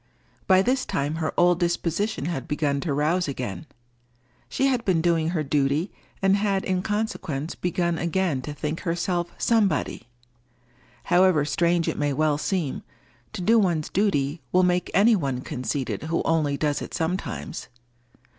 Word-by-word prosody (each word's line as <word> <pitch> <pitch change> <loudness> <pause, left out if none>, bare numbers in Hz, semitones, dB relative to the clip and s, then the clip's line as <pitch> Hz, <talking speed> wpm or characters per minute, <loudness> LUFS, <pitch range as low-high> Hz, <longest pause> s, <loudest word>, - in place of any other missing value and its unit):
By 190 0 +5
this 255 +3 +1
time 145 +3 -2
her 160 -1 -1
old 175 0 +4
disposition 175 +1 -1
had 160 -6 -3
begun 150 -2 0
to 150 - -2
rouse 155 +5 +1
again. 125 -10 -5 0.8
She 270 - 0
had 255 -3 +1
been 185 -6 +2
doing 165 -1 +2
her 165 -3 -1
duty, 145 +5 0 0.3
and 195 0 +5
had 200 -2 0
in 185 -1 0
consequence 185 -8 -3
begun 175 -2 -1
again 170 -5 0
to 150 - -6
think 150 +2 -3
herself 175 0 -1
Somebody. 200 - +1 1.0
However 175 -4 +4
strange 170 +2 +1
it - - -2
may 145 -1 +1
well 150 +1 +1
seem, 165 -4 -2 0.5
to - - -5
do 230 +4 +5
one's 170 -7 +1
duty 160 -7 0
will 185 0 +4
make 180 0 +1
any 220 +3 +6
one 135 -8 -2
conceited 130 +1 -3
who 165 +1 -1
only 155 -3 +1
does 145 -1 0
it - - -6
sometimes. 160 - -3
170 Hz, 155 wpm, -25 LUFS, 150-185 Hz, 1.0 s, any